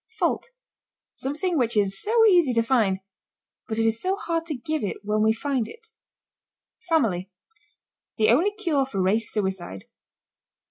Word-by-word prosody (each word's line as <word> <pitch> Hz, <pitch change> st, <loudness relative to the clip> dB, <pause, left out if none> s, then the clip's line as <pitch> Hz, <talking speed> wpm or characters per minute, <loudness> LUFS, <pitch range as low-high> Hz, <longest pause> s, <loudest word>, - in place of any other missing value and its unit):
FAULT. -, -, 0 dB, 0.6 s
Something 310 Hz, +4 st, -2 dB
which 235 Hz, -2 st, +1 dB
is 195 Hz, -1 st, +1 dB
so 450 Hz, +1 st, +3 dB
easy 350 Hz, -, +5 dB
to 230 Hz, -1 st, +2 dB
find, 220 Hz, -6 st, +1 dB, 0.7 s
but 220 Hz, -, -3 dB
it 225 Hz, -, +2 dB
is 225 Hz, 0 st, 0 dB
so 375 Hz, +1 st, 0 dB
hard 335 Hz, -4 st, -3 dB
to 310 Hz, -, -3 dB
give 300 Hz, +4 st, -3 dB
it 200 Hz, -, -2 dB
when 210 Hz, +1 st, 0 dB
we 220 Hz, +1 st, +4 dB
find 250 Hz, 0 st, -1 dB
it. 455 Hz, -1 st, -14 dB, 1.0 s
FAMILY. 205 Hz, -, +1 dB, 0.9 s
The 215 Hz, -2 st, +3 dB
only 325 Hz, -, +4 dB
cure 320 Hz, -10 st, 0 dB
for 200 Hz, -7 st, -4 dB
race 205 Hz, +4 st, +1 dB
suicide. 190 Hz, -, -3 dB
235 Hz, 150 wpm, -25 LUFS, 210-330 Hz, 1.0 s, easy